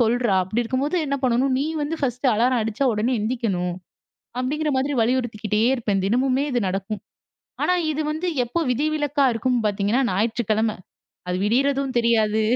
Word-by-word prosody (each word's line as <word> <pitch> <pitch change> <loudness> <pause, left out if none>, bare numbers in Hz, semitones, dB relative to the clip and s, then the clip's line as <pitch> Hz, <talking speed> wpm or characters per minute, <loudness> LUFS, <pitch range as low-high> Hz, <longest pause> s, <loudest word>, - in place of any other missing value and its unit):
சொல்றா, 235 -2 +2
அப்டி 215 +6 -1
இருக்கும்போது 265 +8 -1
என்ன 280 - 0
பண்ணணும்? 255 +1 +2
நீ 275 - 0 0.2
வந்து 300 +3 -2
ஃபர்ஸ்ட்டு 250 0 +1
அலாரம் 245 +2 +2
அடிச்சா 225 +5 -1
உடனே 230 +4 0
எழுந்திக்கணும்." 210 -6 -1 0.7
அப்டிங்கிற 300 +4 -1
மாதிரி 275 +2 0
வலியுறுத்திக்கிட்டே 225 -3 0
இருப்பேன். 205 -6 -1
தினமுமே 255 +5 +1
இது 245 -1 +1
நடக்கும். 195 +3 -3 0.6
ஆனா, 360 - +3 0.2
இது 300 - -3
வந்து 340 +4 -3 0.2
எப்போ 335 +8 -2
விதிவிலக்கா 290 +1 +1
இருக்கும்னு 245 0 0
பார்த்தீங்கன்னா, 205 +5 +1
ஞாயிற்றுக்கிழம. 220 +1 0 0.5
அது 180 - 0
விடியறதும் 270 +3 +1
தெரியாது. 220 -2 +2
240 Hz, 145 wpm, -23 LUFS, 215-270 Hz, 0.7 s, ஆனா